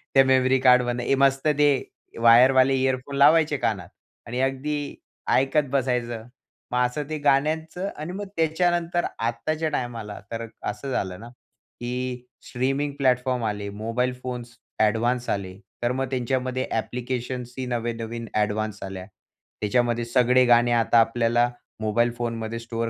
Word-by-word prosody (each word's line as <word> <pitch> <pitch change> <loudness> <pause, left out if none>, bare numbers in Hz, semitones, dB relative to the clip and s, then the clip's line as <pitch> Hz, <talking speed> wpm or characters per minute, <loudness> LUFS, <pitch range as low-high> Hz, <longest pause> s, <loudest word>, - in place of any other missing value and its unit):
त्या 135 - +8
मेमरी 130 0 +3
कार्डमध्ये 125 +1 +4
मस्त 135 +1 +2
ते 145 0 +5 0.5
वायरवाले 130 +3 +6
इयरफोन 130 +1 -1
लावायचे 150 +1 +5
कानात - - -2 0.4
आणि 125 +1 -3
अगदी 140 +2 -2 0.4
ऐकत 135 +2 +2
बसायचं. 120 -4 -1 0.4
मग 125 0 +2
असं 145 +4 -4
ते 155 - -2
गाण्यांचं 160 +6 +1
आणि 155 +3 -5
मग 200 +1 -5
त्याच्यानंतर 175 +1 +1
आत्ताच्या 155 +8 -1
टायमाला 115 -7 -4
तर 115 0 -4 0.2
असं 105 +6 -4
झालं 95 -6 -2
ना, 115 - -10 0.5
की 125 0 -4 0.2
स्ट्रीमिंग 135 +3 -1
प्लॅटफॉर्म 125 -2 +1
आले. 105 -1 -3
मोबाईल 115 +5 -2
फोन्स 120 -1 -6 0.2
ॲडव्हान्स 120 +3 +1
आले. 95 -2 -3 0.3
तर 120 - +2
मग 135 +1 -1
त्यांच्यामध्ये 130 0 -1
ॲप्लिकेशन्स 125 +1 -3
ही 130 - -3
नवे-नवीन 115 -1 -3
ॲडव्हान्स 105 0 -1
आल्या. 95 -1 -6 0.6
त्याच्यामध्ये 120 +2 +1
सगळे 125 +1 +4
गाणे 120 0 +4
आता 115 0 +4
आपल्याला 120 +1 +2 0.3
मोबाईल 120 +3 +1
फोनमध्ये 115 -1 -3
स्टोअर 115 0 -3
125 Hz, 130 wpm, -24 LUFS, 115-135 Hz, 0.6 s, त्या